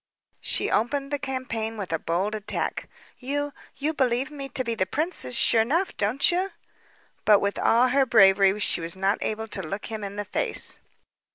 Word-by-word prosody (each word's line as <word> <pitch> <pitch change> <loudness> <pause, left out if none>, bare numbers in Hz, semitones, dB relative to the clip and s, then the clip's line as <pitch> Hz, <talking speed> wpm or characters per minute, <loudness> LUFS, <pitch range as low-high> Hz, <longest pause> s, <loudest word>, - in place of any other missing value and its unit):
She - - 0
opened 275 +5 0
the 290 - -1
campaign 255 -5 -4
with 190 -5 -4
a 165 - 0
bold 180 +7 -1
attack. 210 -1 -3 0.3
"You 285 +2 -3 0.2
you 300 +3 -1
believe 260 0 0
me 275 -2 -7
to 255 - -2
be 230 -1 -2
the 190 -5 -1
princess, 295 - -2
sure 225 -1 +4
'nough, 335 +11 0
don't 220 - +2
you?" 370 +3 0 0.7
But 210 -2 +6
with 200 0 -1
all 245 +3 +4
her 270 +1 +3
bravery, 195 -3 +5
she 175 - +1
was 165 +2 -4
not 195 +2 +1
able 220 +1 -3
to 195 - -3
look 195 +4 -5
him 215 -1 -5
in 200 0 -6
the 205 0 -4
face. - - +1
225 Hz, 185 wpm, -25 LUFS, 200-275 Hz, 0.7 s, But